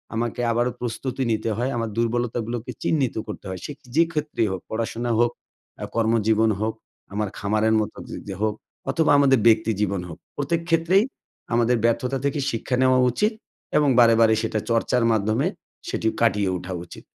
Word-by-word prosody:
আমাকে 120 +1 -2
আবারও 120 +2 +1
প্রস্তুতি 130 +2 -3
নিতে 110 +1 0
হয় 125 +3 0
আমার, 115 -1 -2
দুর্বলতাগুলোকে 115 0 -1
চিহ্নিত 140 -6 +1
করতে 105 - -7
হয় 95 -1 -5
সেক 145 - -7 0.2
যে 165 - +6
ক্ষেত্রেই 150 -7 0
হোক 95 -2 -4
পড়াশোনা 115 +1 -2
হোক, 120 0 +3 0.5
আ - - -1
কর্মজীবন 110 -1 +3
হোক 110 0 0 0.4
আমার 105 0 -1
খামারের 110 +2 +1
মতো 105 - -5
যি - - -6
যে 95 - -4
হোক 110 -1 +1 0.3
অথবা 160 -2 +2
আমাদের 135 -3 +5
ব্যক্তি 110 0 +4
জীবন 100 -2 0
হোক। 80 - -8 0.2
প্রত্যেক 165 +4 -1
ক্ষেত্রেই 165 +5 +4 0.5
আমাদের 120 +1 +3
ব্যর্থতা 125 +3 +1
থেকে 140 +1 0
শিক্ষা 120 +3 -2
নেওয়া 130 0 +4
উচিত, 210 - +1 0.4
এবং 150 -1 +4
বারে, 115 -1 +7
বারে 110 -1 +6
সেটা 110 -1 -1
চর্চার 115 +1 +2
মাধ্যমে 110 - +1 0.4
সেটি 110 - -1
কাটিয়ে 105 -4 +2
ওঠা 90 +1 -6
উচিত। - - -12
115 Hz, 170 wpm, -24 LUFS, 110-130 Hz, 0.5 s, বারে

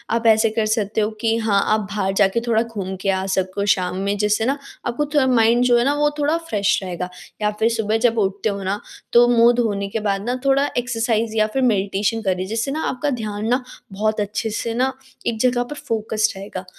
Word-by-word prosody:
आप 230 0 -2
ऐसे 220 0 +5
कर 220 0 -1
सकते 215 0 0
हो 210 - +1
कि 225 -1 +2
हाँ, 215 -3 +2
आप 215 - +2
बाहर 195 -1 -2
जाके 195 +2 +3
थोड़ा 225 -1 +3
घूम 200 -5 -5
के 195 - -1
आ 190 0 0
सको 190 +1 -1
शाम 180 -1 -3
में, 200 +1 -1
जिससे 210 +2 +1
ना 275 +3 +1 0.3
आपको 240 +5 -1
थोड़ा 285 -3 +3
माइंड 240 -1 +4
जो 245 -1 +4
है 240 - +2
ना, 280 - +3
वो 295 0 +2
थोड़ा 295 +3 +2
फ्रेश 205 0 +2
रहेगा। 180 -1 -4 0.3
या 210 0 +2
फिर 225 +1 +3
सुबह 220 -1 0
जब 230 0 -2
उठते 200 +1 0
हो 200 -1 -4
ना, 195 +2 -1 0.3
तो 240 0 +7
मुँह 235 +1 +6
धोने 205 -4 0
के 225 - -2
बाद 195 0 -1
ना 250 - 0
थोड़ा 275 +1 +3
एक्सरसाइज़ 230 -2 0
या 215 0 +3
फिर 265 - +2
मेडिटेशन 200 +2 0
करिए, 185 -3 -1
जिससे 225 +6 -2
ना 315 +3 -2
आपका 290 +3 -2
ध्यान 210 0 -3
ना 250 +2 +1 0.3
बहुत 215 +2 0
अच्छे 210 +2 -2
से 225 +1 -3
ना 260 +3 0 0.3
एक 225 -2 -1
जगह 245 0 +2
पर 245 +5 -8
फोकस्ड 220 -1 0
रहेगा। 195 -1 -7
220 Hz, 220 wpm, -21 LUFS, 200-235 Hz, 0.3 s, तो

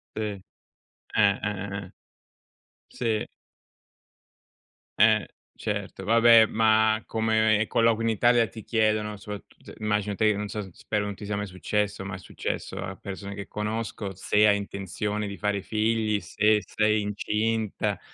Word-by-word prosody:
Sì, - - -4
eh, 105 -3 -4 0.7
eh, 100 -1 +4
eh, 100 -1 -3
eh. 95 - -17 1.0
Sì. 110 -3 -2 1.7
Eh, - - +5 0.3
certo, 100 -2 -4
vabbè, 115 +1 +7
ma 110 0 +3
come 110 -1 +2
colloqui 115 -1 +2
in 115 - +2
Italia, 120 +2 +4
ti 110 -1 -10
chiedono 110 -1 +1
soprat 105 0 -8 0.3
immagino 105 -1 0
te 110 +2 +2
che 100 - -2
non 105 - -3
so 105 - -3
s 95 - -8
spero 105 +4 -2
non 100 -1 -4
ti 105 - -9
sia 105 0 -2
mai 105 0 -3
successo, 100 +2 -2
ma 100 - -5
è 95 - -6
successo 95 - -5
a 95 0 -5
persone 100 0 -7
che 100 0 -7
conosco, 105 -1 -4
se 105 +3 +3
hai 105 - +5
intenzione 100 +1 -3
di 100 -1 -5
fare 105 -2 -1
figli, 110 +1 +1
se 105 0 +2
sei 110 0 +1
incinta, 105 +1 -1
105 Hz, 150 wpm, -26 LUFS, 100-110 Hz, 1.7 s, vabbè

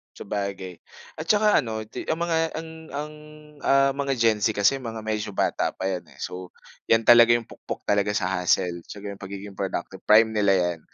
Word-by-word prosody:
Sabagay, 100 -3 -5 0.4
at 160 - -6
saka 210 +1 +4
ano, 110 -2 -4
di 110 - -8
ang 160 - +1
mga 165 -1 0 0.2
ang 160 0 -6 0.2
ang, 150 +2 -5 0.5
ah, 135 0 +3
mga 140 0 -2
Gen 115 -3 +2
Z 110 +1 +1
kasi 105 +7 +3
mga 115 -3 -6
medyo 105 -2 -3
bata - - 0
pa - - -7
yan, 90 -2 -5
eh. - - -19
So, 90 0 -7 0.3
'yan 115 0 +4
talaga 120 0 +7
yung 120 - -1
pukpok - - -8
talaga 105 0 +1
sa 95 -3 0
hustle. 90 -1 +1
Tsaka 100 0 -7
yung 100 - -10
pagiging 100 0 -9
productive, 95 -1 -4
prime 110 +1 +6
nila 100 -3 +3
yan, 90 -2 0
105 Hz, 190 wpm, -25 LUFS, 95-120 Hz, 0.5 s, talaga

